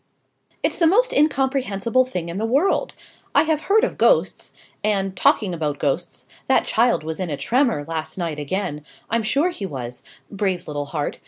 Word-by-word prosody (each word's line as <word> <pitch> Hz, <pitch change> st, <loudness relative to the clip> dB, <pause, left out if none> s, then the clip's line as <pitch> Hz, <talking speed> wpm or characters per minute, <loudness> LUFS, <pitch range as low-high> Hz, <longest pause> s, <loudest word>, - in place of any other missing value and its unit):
"It's -, -, 0 dB
the 335 Hz, -, +5 dB
most 475 Hz, +9 st, +3 dB
incomprehensible 260 Hz, -5 st, +1 dB
thing 180 Hz, -9 st, -4 dB
in 170 Hz, +3 st, -4 dB
the 220 Hz, -, 0 dB
world! 285 Hz, +11 st, +1 dB, 0.4 s
I -, -, +6 dB
have 315 Hz, -1 st, 0 dB
heard 430 Hz, +6 st, +3 dB
of -, -, -1 dB
ghosts -, -, +2 dB, 0.3 s
and, 195 Hz, -2 st, 0 dB
talking 190 Hz, +1 st, +2 dB
about 150 Hz, -3 st, -2 dB
ghosts, 155 Hz, +6 st, -2 dB, 0.2 s
that 265 Hz, -, +3 dB
child 235 Hz, -5 st, +2 dB
was 160 Hz, +2 st, -5 dB
in 185 Hz, -2 st, -2 dB
a 145 Hz, -, -3 dB
tremor, 230 Hz, -, +1 dB
last 160 Hz, 0 st, -4 dB
night, 165 Hz, -4 st, -3 dB
again 150 Hz, -1 st, -3 dB, 0.3 s
I'm 230 Hz, 0 st, +2 dB
sure 280 Hz, +11 st, +1 dB
he 205 Hz, -, -5 dB
was. 125 Hz, -5 st, -6 dB, 0.3 s
Brave 190 Hz, -3 st, -2 dB
little 145 Hz, -1 st, -3 dB
heart! 150 Hz, -1 st, -3 dB
195 Hz, 175 wpm, -22 LUFS, 160-265 Hz, 0.4 s, I